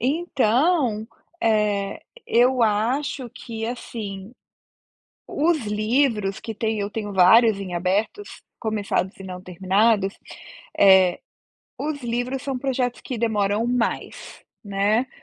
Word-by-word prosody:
Então, 260 -3 +1 0.4
eh, 210 -3 +1 0.3
eu 250 +1 +3
acho 240 +5 0
que, 225 0 -7
assim, 215 -4 -6 1.0
os 310 -4 0
livros 215 -1 0
que 225 -1 -6
têm 220 0 -1
eu 200 0 -2
tenho 210 -1 -4
vários 200 +3 +6
em 185 -2 -6
abertos, 195 - -2 0.2
começados 205 -3 -2
e - - -9
não 180 -1 -7
terminados. 195 +3 +1 0.7
Eh, 190 -2 +6 0.6
os 295 -1 -4
livros 245 +3 -2
são 270 -2 -3
projetos 255 -2 -2
que 250 - -5
demoram 210 -1 0
mais, 245 -1 -3 0.2
né, 205 +4 +1
220 Hz, 110 wpm, -23 LUFS, 200-250 Hz, 1.0 s, vários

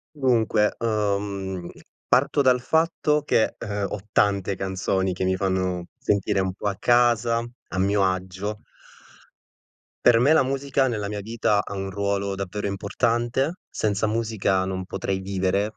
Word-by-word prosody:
Dunque, 115 -6 +2
uhm, 100 -4 -2 0.4
parto 140 +3 +3
dal 125 -1 +4
fatto 160 0 +1
che, 115 -6 +2
ehm, 100 -2 -3
ho 105 - -4
tante 100 -2 +1
canzoni 95 0 -1
che 95 +1 -2
mi 95 0 +1
fanno 95 -2 -1
sentire 100 0 +1
un 95 -1 -1
po' 105 - -6
a 100 - -2
casa 120 -1 +3 0.3
a 95 - -3
mio 100 +2 +2
agio. 95 +3 -2 1.4
Per 120 - +6
me 140 +5 +5
la 160 - +5
musica 135 0 0
nella 105 -4 -2
mia 105 0 -4
vita 105 -1 +1
ha - - -7
un 95 0 -4
ruolo 100 0 -1
davvero 100 +2 -4
importante. 120 - 0
Senza 105 0 0
musica 105 -4 0
non 95 0 -3
potrei 95 0 -2
vivere, 95 +2 -1
100 Hz, 145 wpm, -24 LUFS, 95-115 Hz, 1.4 s, Per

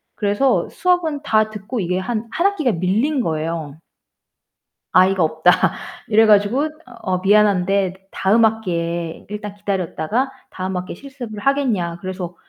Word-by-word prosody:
그래서 205 +6 +1
수업은 355 -5 0
다 215 -4 +2
듣고 215 +3 -5
이게 180 -1 -1
한 220 +3 -3
1 340 +9 +2
학기가 310 - 0
밀린 220 - +1
거예요. 160 -4 -3 1.1
"아이가 185 0 +4
없다." 160 +2 +3 0.6
이래 220 +1 +5
가지고 215 +8 +3 0.2
"어 230 -7 -3
미안한데 195 -1 +3 0.2
다음 215 +4 +3
학기에 170 -6 -2
일단 210 0 -6
기다렸다가 200 - -2 0.2
다음 185 0 -4
학기에 180 0 -4
실습을 255 -5 -9
하겠냐." 220 -11 0
그래서 185 -1 -5
205 Hz, 295 characters per minute, -20 LUFS, 180-235 Hz, 1.1 s, 이래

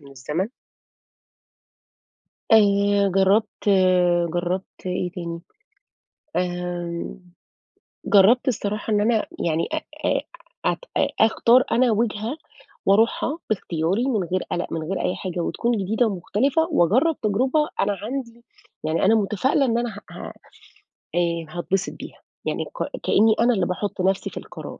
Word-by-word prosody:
من 140 -1 -15
الزمن. 150 - -3 2.0
آآ 200 -2 +4
جرّبت، 195 +3 +1 0.7
جرّبت 180 +2 -3
إيه 180 0 -2
تاني؟ 170 -2 -5 1.0
آمم، 175 -1 -3 0.9
جرّبت 215 +6 +5
الصراحة 210 -2 -1
إن 205 - +3
أنا 220 0 +2
يعني 165 -1 0
أ - - +1 0.3
أ - - +2 0.4
أت - - +1 0.2
أ - - +3
أختار 235 +3 +5
أنا 245 0 +3
وِجهة 220 +4 -1 0.5
وأرُوحها 225 +9 +2
باختياري 185 +1 0
من 220 -8 +1
غير 185 +2 -2
قلَق، 175 - -2
من 165 - -2
غير 190 +4 -3
أي 180 - 0
حاجة، 185 -3 -5
وتكُون 235 +7 -1
جديدة 220 +5 +1
ومختلِفة، 215 - 0
وأجرّب 255 - +3
تجربة 260 +9 +1
أنا 205 0 +2
عندي 235 0 -5 0.4
يعني 160 +4 +1
أنا 220 +3 +5
متفائلة 220 +7 +1
إن 230 -1 +1
أنا 240 0 -1
ه 205 -2 -9
ه - - -8 0.8
آآ 170 -1 0
هاتبسط 185 +3 -2
بيها. - - -10 0.3
يعني - - -2
ك - - -5
كأني 220 +1 +4
أنا 240 +1 +4
اللي 190 -4 +1
باحُط 185 +2 -3
نَفْسي 190 +1 +1
في - - -11
القرار. - - -8
200 Hz, 135 wpm, -23 LUFS, 180-230 Hz, 2.0 s, جرّبت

